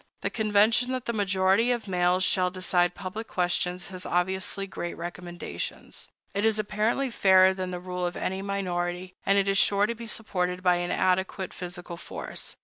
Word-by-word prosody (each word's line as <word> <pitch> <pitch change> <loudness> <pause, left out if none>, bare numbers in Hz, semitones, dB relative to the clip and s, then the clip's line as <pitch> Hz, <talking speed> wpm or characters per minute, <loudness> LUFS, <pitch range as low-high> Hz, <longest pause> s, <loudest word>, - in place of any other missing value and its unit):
The - - -1
convention 220 +3 +3
that 255 -1 -3
the 235 - -1
majority 195 +2 +3
of 240 -3 -2
males 180 0 +2
shall 185 -1 +3
decide 180 -1 +1
public 200 +4 -6
questions 180 0 0
has 185 -1 -6
obviously 190 +2 0
great 175 -3 -5
recommendations. 175 0 -6 0.3
It 200 - -1
is 220 -1 +3
apparently 215 +5 0
fairer 190 -3 +6
than 185 -1 -4
the 180 -1 -4
rule 180 0 -3
of 175 - -5
any 190 +1 -2
minority, 180 -2 -2
and 195 +1 +5
it 200 0 +3
is 195 0 +3
sure 200 0 +4
to 230 - -1
be 230 0 -9
supported 180 -5 -1
by 180 -1 +4
an 175 0 -2
adequate 185 0 0
physical 175 -1 -7
force. - - -6
190 Hz, 175 wpm, -27 LUFS, 180-205 Hz, 0.3 s, fairer